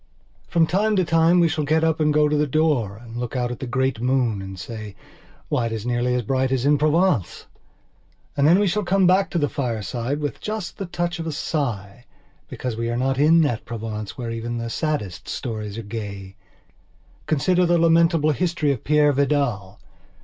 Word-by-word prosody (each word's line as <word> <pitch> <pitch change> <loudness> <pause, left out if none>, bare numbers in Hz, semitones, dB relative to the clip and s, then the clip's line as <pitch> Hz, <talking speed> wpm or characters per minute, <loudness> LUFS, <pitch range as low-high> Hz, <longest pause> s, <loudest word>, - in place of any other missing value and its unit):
From 165 -1 +3
time 205 +6 +1
to 185 -2 +2
time 165 +2 +4
we 170 - +5
shall 160 -1 -1
get 160 +2 +1
up 160 -1 +1
and 150 -1 +3
go 150 0 +3
to 150 - 0
the 150 0 +1
door 140 -9 +1
and 115 0 -12
look 125 +1 -4
out 125 -1 -1
at 125 - -6
the 130 - -5
great 130 -1 -1
moon 125 -5 +1
and 95 -1 -8
say: 105 +1 -7 0.5
"Why, 115 - 0
it - - -5
is 110 -1 -4
nearly 120 +1 0
as 125 - -1
bright 130 +3 0
as 130 -1 0
in 145 0 +3
Provence!" 155 - +1 0.9
And 145 0 +3
then 170 +4 +6
we 205 - +2
shall 205 +3 0
come 190 +1 +2
back 190 +2 +3
to - - -2
the 145 -3 +2
fireside, 120 +1 -3
with 145 -1 -4
just 215 -4 -5
the 195 - -4
touch 175 0 -3
of 165 - -4
a - - -2
sigh 120 - -3 0.4
because 125 -3 -4
we 115 +1 -2
are 120 - -1
not 135 +1 0
in 160 +3 +5
that 120 -8 0
Provence 110 -2 -6
where 120 -3 -4
even 115 +1 -4
the 115 0 -4
saddest 105 - -3
stories 110 -3 -5
are 115 - -5
gay. 100 -3 -7 0.9
Consider 175 +4 +2
the 175 0 +3
lamentable 165 -1 +3
history 165 -1 0
of 130 - -4
Peire 150 0 +3
Vidal. 130 -9 0
135 Hz, 200 wpm, -22 LUFS, 115-160 Hz, 0.9 s, then